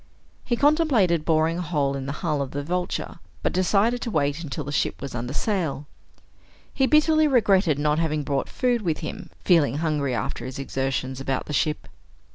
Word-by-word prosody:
He 240 - 0
contemplated 255 - +3
boring 160 +1 +2
a - - -1
hole 145 -5 0
in 135 0 -5
the - - -2
hull 150 -3 0
of 135 - -3
the 145 +2 -4
Vulture 175 +1 -3 0.2
but - - 0
decided 205 +6 +2
to - - -3
wait 145 -3 0
until 150 0 -4
the 145 - -6
ship - - -1
was 140 - -6
under 120 +1 -4
sail. 160 -4 -1 0.9
He 265 -1 +2
bitterly 310 +1 +4
regretted 195 - +3
not 150 +1 +1
having 155 -2 0
brought 140 -1 -2
food 245 -2 0
with 165 -6 -2
him, - - -6 0.2
feeling 150 -7 +4
hungry 150 -5 0
after 120 - -3
his 130 +1 -6
exertions 135 -1 -3
about 135 -1 -2
the 150 - -6
ship. 150 +1 0
155 Hz, 185 wpm, -24 LUFS, 140-195 Hz, 0.9 s, bitterly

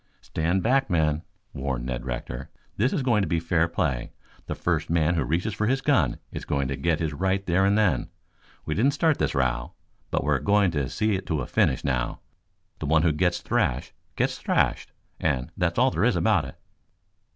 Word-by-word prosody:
"Stand 85 +4 -1
back, 135 +3 +2
men," 80 -3 +1 0.3
warned 65 -3 -3
Ned 60 -1 -4
Rector. 60 +1 -5 0.3
"This 125 +6 +2
is 140 - -1
going 115 -5 +3
to 95 - 0
be 85 +1 +1
fair 85 0 +1
play. 75 -7 -2 0.4
The - - -3
first 85 -1 -1
man 85 0 +2
who 80 - +1
reaches 90 +7 -1
for 105 - -1
his 135 +3 +2
gun 90 - +2
is - - -6
going 70 -1 -1
to 70 - -1
get 85 +2 +1
his 80 -2 -1
right 95 +4 0
there 90 +2 +2
and 100 +1 +3
then. 95 - +2 0.6
We 80 - -1
didn't 135 - +2
start 155 0 +2
this - - 0
row, 60 -2 0 0.4
but - - 0
we're - - +2
going 100 -2 +3
to 70 -5 -1
see 110 -1 0
it 95 - -3
to 80 -5 0
a - - -3
finish 65 - +1
now. 60 -3 -1 0.6
The 75 - -4
one 80 +1 +3
who 85 - +4
gets 90 +3 0
thrashed 60 - 0 0.2
gets - - 0
thrashed, - - 0 0.3
and 65 0 -1
that's - - 0
all - - +4
there - - +1
is - - +3
about - - +2
it." - - -10
80 Hz, 205 wpm, -26 LUFS, 70-100 Hz, 0.6 s, who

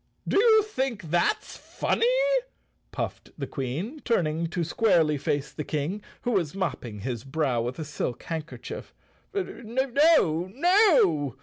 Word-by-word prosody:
" - - -26
Do - - +3
you 440 -1 +6
think 265 - -2
that's 175 0 +1
funny? 470 - 0 0.5
" - - -43 0.3
puffed - - -5
the - - -3
Queen, 155 - -4
turn¬ 230 - +1
ing 160 +2 -2
to 170 +1 -2
squarely 165 -4 +3
face 145 +1 -1
the 150 - -5
King, 155 +8 -2 0.2
who 245 - 0
was 185 -7 0
mopping 120 - -3
his 120 0 -4
brow 135 -4 0
with 120 +2 -3
a 160 - -4
silk 135 -4 -4
handkerchief. 165 -1 -6 0.4
"No—no!" 260 - +3
170 Hz, 140 wpm, -27 LUFS, -, 0.5 s, you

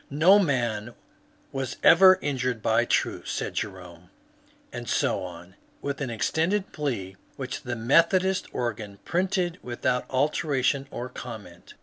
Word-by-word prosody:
'' - - -34 0.2
No 195 +3 +8
man 120 - -1 0.6
was 135 -1 -4
ever 185 +2 +8
injured 125 -5 -2
by - - +3
truth," - - -1
said - - -3
Jerome. 90 -2 -6 0.6
And - - -6
so - - +1
on, 90 0 -9 0.3
with 140 0 -4
an 135 - -2
extended 165 - -1
plea 105 -11 -3 0.2
which 130 -2 -5
the 120 -1 -4
Methodist 170 - +3
organ 110 -4 -4
printed 180 0 0
without 125 +1 -2
alteration 140 -1 0
or 125 -3 -5
comment. 110 -9 -10
130 Hz, 130 wpm, -26 LUFS, 110-160 Hz, 0.6 s, No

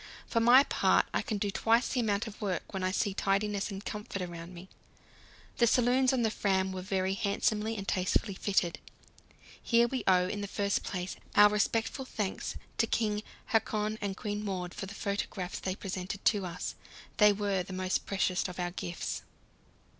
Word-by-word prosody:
For 230 - 0
my 245 +4 +7
part, - - +3
I - - +2
can 215 - -2
do 200 0 -1
twice 230 +4 +2
the 255 - 0
amount 215 -2 +1
of 220 -1 -9
work 195 -2 -3
when 190 -1 -2
I 185 - +2
see 195 +1 0
tidiness 200 +1 0
and 195 0 -7
comfort 210 -2 -5
around 170 0 -7
me. 180 +1 -10 0.9
The 235 - +4
saloons 250 +2 +4
on 255 -3 +1
the 220 - +2
Fram 190 -2 +1
were 185 -1 -4
very 190 0 0
handsomely 210 +2 0
and 195 -1 -6
tastefully 190 +2 +1
fitted. 190 -3 0 0.8
Here 235 0 +4
we 255 -2 -3
owe, 180 -1 +5
in 205 +2 -3
the 200 - -3
first 200 0 0
place, 185 -1 -4 0.2
our 210 0 +8
respectful 225 +5 0
thanks 210 -6 -3 0.2
to 230 - +3
King 210 -2 0 0.3
Haakon 215 -1 0
and 200 -2 -3
Queen 210 0 -3
Maud 185 -3 -3
for 195 - -5
the 200 - -8
photographs 200 -2 -3
they 185 -1 -2
presented 190 0 -5
to 205 -5 +3
us; 170 - -4 0.4
they 210 -1 +7
were 200 -2 0
the 180 - -8
most 185 0 -1
precious 185 -2 +1
of 180 0 -8
our 175 0 -1
gifts. 90 - -4
200 Hz, 185 wpm, -31 LUFS, 190-215 Hz, 0.9 s, our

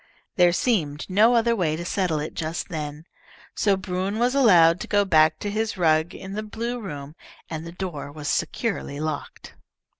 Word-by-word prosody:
There 180 -2 +5
seemed 165 - 0
no 220 +5 +5
other 235 0 +3
way 165 -7 0
to 170 +2 -6
settle 175 -4 0
it 150 +2 -5
just 160 +1 -4
then, 150 -1 -5 0.5
so 200 -2 +2
Bruin 190 +2 -3
was 245 +2 +2
allowed 180 -11 +5
to - - -6
go 205 0 +2
back 155 -3 +4
to 205 - -4
his 220 0 -2
rug 160 0 +2
in 190 +1 -8
the 215 - -3
blue 230 +3 -4
room, 145 -8 -7 0.4
and 160 +1 -5
the - - -7
door 170 -6 -6
was 145 0 -7
securely 195 -10 -2
locked. 155 -1 -5
180 Hz, 180 wpm, -24 LUFS, 155-210 Hz, 0.5 s, There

